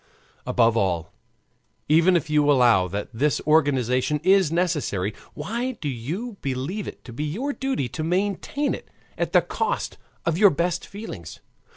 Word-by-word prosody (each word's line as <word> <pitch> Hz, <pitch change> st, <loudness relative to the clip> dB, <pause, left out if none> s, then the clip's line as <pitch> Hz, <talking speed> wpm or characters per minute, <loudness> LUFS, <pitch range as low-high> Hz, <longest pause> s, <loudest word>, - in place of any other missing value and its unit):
Above 115 Hz, -2 st, +3 dB
all, 90 Hz, -6 st, 0 dB, 0.7 s
even 165 Hz, +4 st, +5 dB
if 165 Hz, -, -3 dB
you 150 Hz, -1 st, +3 dB
allow 120 Hz, -9 st, +5 dB
that 100 Hz, +3 st, -4 dB
this 140 Hz, +6 st, +1 dB
organization 145 Hz, -2 st, +2 dB
is 190 Hz, -3 st, +4 dB
necessary, 150 Hz, -, 0 dB, 0.2 s
why 235 Hz, -, -3 dB
do 165 Hz, -10 st, -6 dB
you 165 Hz, -, -4 dB
believe 140 Hz, +10 st, -3 dB
it -, -, -9 dB
to 120 Hz, -, -10 dB
be 145 Hz, -, -3 dB
your 225 Hz, -, -2 dB
duty 265 Hz, -, -1 dB
to 155 Hz, +6 st, -5 dB
maintain 200 Hz, -, 0 dB
it -, -, -8 dB, 0.3 s
at -, -, -2 dB
the -, -, +5 dB
cost -, -, -2 dB, 0.3 s
of 170 Hz, 0 st, 0 dB
your 205 Hz, -1 st, +8 dB
best 175 Hz, +3 st, -1 dB
feelings? 140 Hz, -, -8 dB
150 Hz, 155 wpm, -24 LUFS, 125-190 Hz, 0.7 s, your